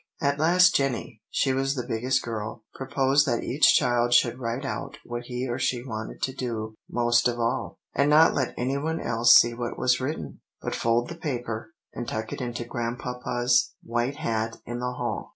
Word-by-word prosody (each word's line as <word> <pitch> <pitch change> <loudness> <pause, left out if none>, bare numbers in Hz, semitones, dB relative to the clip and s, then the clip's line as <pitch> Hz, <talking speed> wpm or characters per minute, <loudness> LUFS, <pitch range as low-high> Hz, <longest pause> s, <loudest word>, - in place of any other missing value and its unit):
At 140 0 0
last 180 +3 +5
Jenny, 125 -5 -1
she 135 - +1
was 135 +1 0
the 125 - -3
biggest 130 +4 0
girl, 110 -1 -5
proposed 135 +2 +2
that 120 - 0
each 140 +5 +4
child 120 -2 +3
should 120 +1 +3
write 120 +3 -3
out 140 +2 -5
what 120 0 -5
he 125 +1 -3
or 120 +1 -3
she 125 -2 0
wanted 110 -3 -6
to 130 - 0
do 110 -4 -4 0.2
most 120 0 +3
of 120 0 -2
all, 115 0 -1 0.2
and 140 +1 +2
not 155 +2 +6
let 130 -3 -1
any 130 +3 -1
one 160 +3 -2
else 120 +1 +5
see 120 0 +6
what 120 0 -4
was 125 0 +2
written, 145 +5 -4 0.2
but - - -4
fold 115 +1 +1
the 170 - -7
paper, 120 -8 -4 0.2
and 120 - -5
tuck 110 -1 -4
it - - -5
into 120 -1 -4
Grandpapa's 120 +1 -1
white 120 +4 -1
hat 115 -6 -2
in 120 +1 -5
the 125 0 -2
hall. - - -4
120 Hz, 190 wpm, -26 LUFS, 120-135 Hz, 0.2 s, not